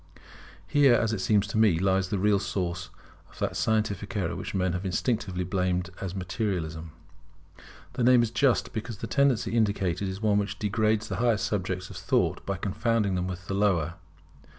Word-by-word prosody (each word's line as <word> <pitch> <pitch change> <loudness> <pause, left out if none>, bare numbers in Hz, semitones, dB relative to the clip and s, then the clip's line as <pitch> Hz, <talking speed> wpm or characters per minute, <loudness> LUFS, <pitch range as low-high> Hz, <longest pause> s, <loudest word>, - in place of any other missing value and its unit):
Here, 140 -4 +5
as 110 -1 +1
it 100 - -2
seems 105 0 +3
to 105 +1 -2
me, 105 -7 +4
lies 95 +1 +1
the 100 - -1
real 100 +1 +3
source 90 -3 -3 0.4
of - - -18
that - - -2
scientific 105 -2 -1
error 90 -4 -1
which - - -5
men 90 -2 +1
have 90 +1 -3
instinctively 95 -1 -1
blamed 90 0 -1
as 95 -1 -4
materialism. 90 -5 -3 1.0
The 125 - -1
name 125 0 +6
is 115 - -2
just, 125 +1 +2
because 110 0 -5
the 115 - -5
tendency 135 0 +2
indicated 100 -4 +1
is 95 +1 -5
one 105 -1 +2
which 100 0 -3
degrades 110 +1 +1
the 95 - -4
higher 115 0 +2
subjects 95 -2 -2
of - - -8
thought - - 0
by 100 0 -1
confounding 105 +1 0
them 90 0 -1
with 90 -1 -6
the 95 - -4
lower. 95 -6 +1
100 Hz, 180 wpm, -27 LUFS, 90-110 Hz, 1.0 s, name